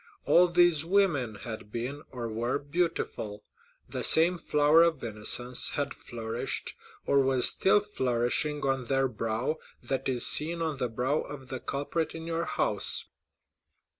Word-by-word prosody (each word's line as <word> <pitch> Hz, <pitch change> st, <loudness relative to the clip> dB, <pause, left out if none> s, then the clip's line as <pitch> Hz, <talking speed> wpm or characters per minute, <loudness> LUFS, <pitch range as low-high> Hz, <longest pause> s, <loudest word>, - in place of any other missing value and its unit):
All 180 Hz, +1 st, +5 dB
these 175 Hz, -3 st, +3 dB
women 165 Hz, -, +1 dB
had 110 Hz, 0 st, -8 dB
been, 125 Hz, +6 st, -5 dB
or 120 Hz, -2 st, -6 dB
were, 115 Hz, +4 st, -2 dB
beautiful. 145 Hz, -9 st, -3 dB, 0.4 s
The -, -, -5 dB
same 170 Hz, +2 st, +4 dB
flower 150 Hz, +1 st, +3 dB
of 170 Hz, -4 st, +1 dB
innocence 120 Hz, +3 st, +1 dB
had 140 Hz, -2 st, -2 dB
flourished, 115 Hz, 0 st, -5 dB, 0.3 s
or 140 Hz, -, +3 dB
was 135 Hz, -2 st, +5 dB
still 200 Hz, +2 st, +4 dB
flourishing, 140 Hz, -, -1 dB
on 135 Hz, -2 st, -1 dB
their 135 Hz, +2 st, +1 dB
brow, 115 Hz, +6 st, -3 dB, 0.2 s
that 135 Hz, 0 st, -2 dB
is 125 Hz, -2 st, +1 dB
seen 165 Hz, +3 st, +2 dB
on 160 Hz, -3 st, -2 dB
the 125 Hz, -2 st, -2 dB
brow 125 Hz, +6 st, -1 dB
of 135 Hz, -3 st, -10 dB
the 130 Hz, -, -5 dB
culprit 145 Hz, +6 st, -3 dB
in 165 Hz, 0 st, -7 dB
your 165 Hz, 0 st, -2 dB
house." -, -, +1 dB
135 Hz, 145 wpm, -28 LUFS, 120-160 Hz, 0.4 s, All